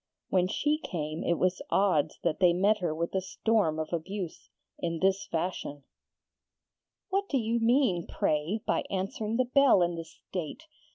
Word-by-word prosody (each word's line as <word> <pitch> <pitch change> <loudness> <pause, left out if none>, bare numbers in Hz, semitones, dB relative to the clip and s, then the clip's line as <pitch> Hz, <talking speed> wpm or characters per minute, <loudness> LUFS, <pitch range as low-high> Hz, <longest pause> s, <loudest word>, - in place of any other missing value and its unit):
When 180 -1 +3
she 295 +9 0
came 155 - -4
it 170 - +1
was 185 0 +1
odds 160 -7 +2
that 170 -3 0
they 180 -2 +5
met 205 +4 +3
her 175 -4 -1
with 170 +1 -2
a 190 - +1
storm 195 -4 +1
of 160 +2 -4
abuse, 180 +1 -4 0.3
in 165 -1 -2
this 190 +3 +1
fashion: 160 -4 -3 1.3
'What 395 +1 0
do 275 - +2
you 230 -1 0
mean, 230 - +2
pray, 155 +9 0
by - - +1
answering 205 +3 -2
the 255 - +3
bell 255 -6 +5
in 175 0 0
this 165 -1 -9
state? 180 - -5
185 Hz, 165 wpm, -29 LUFS, 165-220 Hz, 1.3 s, they